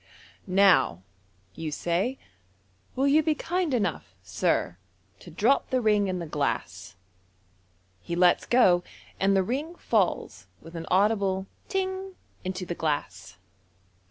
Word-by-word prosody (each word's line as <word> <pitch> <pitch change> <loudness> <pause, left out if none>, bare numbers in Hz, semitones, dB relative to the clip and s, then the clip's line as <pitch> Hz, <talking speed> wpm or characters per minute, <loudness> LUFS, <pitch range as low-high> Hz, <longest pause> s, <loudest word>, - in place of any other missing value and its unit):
" - - -33 0.2
Now," 95 - +3 0.5
you 160 -1 -5
say, 175 - -1 0.4
" 95 -1 -38
will 270 - +1
you 295 +3 +5
be 310 -1 +1
kind 350 +1 -1
enough, 200 - -2
sir, 100 -2 -1 0.4
to - - -13
drop 220 - +1
the 260 - +1
ring 210 -3 +2
in 185 -1 -2
the 170 - -4
glass.*' 145 -2 -3 1.1
He 170 - -4
lets 175 0 +3
go, 185 -8 +4 0.4
and 195 0 +3
the 190 - +3
ring 285 - -3
falls 175 - -1
with 165 - -13
an 165 0 -6
audible 195 -1 +2 0.2
"ting" 380 -1 -3 0.3
into 185 0 -4
the 175 - -3
glass. 155 -3 -3
190 Hz, 135 wpm, -27 LUFS, 165-255 Hz, 1.1 s, you